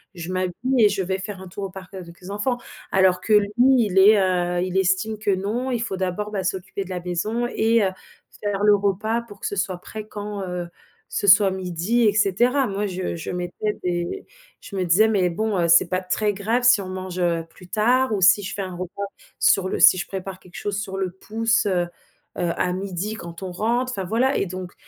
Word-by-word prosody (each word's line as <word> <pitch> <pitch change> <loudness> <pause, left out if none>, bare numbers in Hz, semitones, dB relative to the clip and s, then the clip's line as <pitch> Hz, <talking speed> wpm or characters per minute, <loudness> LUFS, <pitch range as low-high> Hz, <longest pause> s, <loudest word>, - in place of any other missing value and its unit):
je 170 +2 -6
m'habille 185 -1 -1 0.3
et 210 - +7
je 195 -1 -1
vais 190 +1 -2
faire 190 0 -6
un 190 - -9
tour 195 +2 -6
au - - -5
parc 190 0 -11
avec 170 -3 -10
les 185 +2 -9
enfants. 245 +5 -1 0.3
Alors 185 -1 +3
que 215 - 0
lui 210 -1 +6 0.3
il 205 -5 +1
est, 210 +2 +7
heu, 180 -2 +1
il 185 +1 -2
estime 190 +4 +1
que 215 - -2
non, 205 +7 -1
il 240 - 0
faut 195 -5 -3
d'abord, 190 +3 -3
bah, 195 -3 -2
s'occuper 190 +2 -3
de 190 - -12
la 180 -1 -3
maison 210 +7 -2
et 225 -1 +2
heu, 190 - 0 0.5
faire 205 -1 -1
le 210 0 +6
repas 205 +3 0
pour 205 -4 -14
que - - -7
ce 205 - -4
soit 190 -2 -1
prêt 215 +4 -8
quand, 205 -1 -6
heu, 180 -1 -4 0.4
ce 205 - -1
soit 200 0 +7
midi 185 +5 -1
et 215 -3 +4
cetera. 240 +7 +2
Moi 205 0 -2
je 185 -2 -3
je 165 - -6
mettais 180 +4 -3
des 175 - -2 0.3
je 200 - -10
me 185 -1 0
disais: 185 +6 +5
«Mais 195 -5 +2
bon, 215 +4 -1
heu, 170 - +2
c'est 170 +2 +6
pas 185 +1 -1
très 205 +3 0
grave 225 +5 -1
si 245 -4 +6
on 185 - -7
mange, 185 -1 -5
heu, 170 -2 0
plus 180 +2 -16
tard 245 +5 +2
ou 195 - -2
si 200 +2 +6
je 190 - -5
fais 200 - -3
un 185 -1 -6
repas 185 +3 -5 0.3
sur 190 -1 +3
le - - -2
si 185 - +7
je - - -4
prépare 190 -1 -6
quelque 180 -1 -18
chose 205 -1 -2
sur 195 -2 -5
le 190 -2 -2
pouce, 220 +3 0
heu 180 -2 +1 0.5
heu, 175 -2 0
à 180 -1 0
midi 195 +3 -3
quand 170 -4 -9
on 190 -1 -5
rentre». 235 +7 0
Enfin 195 -6 -3
voilà 235 +8 +1
et - - 0
donc 185 0 -7
195 Hz, 230 wpm, -23 LUFS, 180-210 Hz, 0.5 s, et